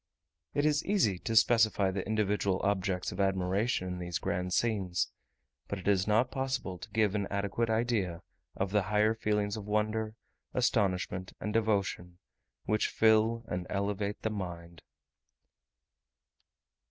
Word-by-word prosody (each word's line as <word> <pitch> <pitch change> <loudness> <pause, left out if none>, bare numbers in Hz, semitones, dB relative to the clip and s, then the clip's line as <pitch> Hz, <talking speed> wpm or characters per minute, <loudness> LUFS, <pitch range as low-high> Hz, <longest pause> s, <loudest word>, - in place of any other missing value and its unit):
It 145 0 +2
is 150 0 +2
easy 165 - +2
to 115 - -3
specify 110 -3 +4
the 95 0 -3
individual 105 -3 +1
objects 95 -2 0
of 90 - -8
admiration 95 +2 +1
in 90 0 -4
these 90 -1 -2
grand 90 +1 -2
scenes; 95 -3 0 0.6
but 100 - -3
it 95 - -8
is 95 -1 +3
not 115 +4 +3
possible 130 -9 -2
to - - -9
give 110 -3 +2
an 100 -2 -1
adequate 100 +3 -1
idea 110 -7 0 0.3
of 95 0 -2
the 105 0 +3
higher 105 +2 +2
feelings 105 -2 -1
of 105 - -6
wonder, 110 +1 0 0.4
astonishment, 95 -6 0
and 105 - -3
devotion, 100 -5 0 0.5
which 105 +1 +1
fill 110 +1 +3
and 90 0 -3
elevate 100 +1 -2
the 110 - 0
mind. 85 -4 -6
105 Hz, 140 wpm, -31 LUFS, 95-110 Hz, 0.6 s, specify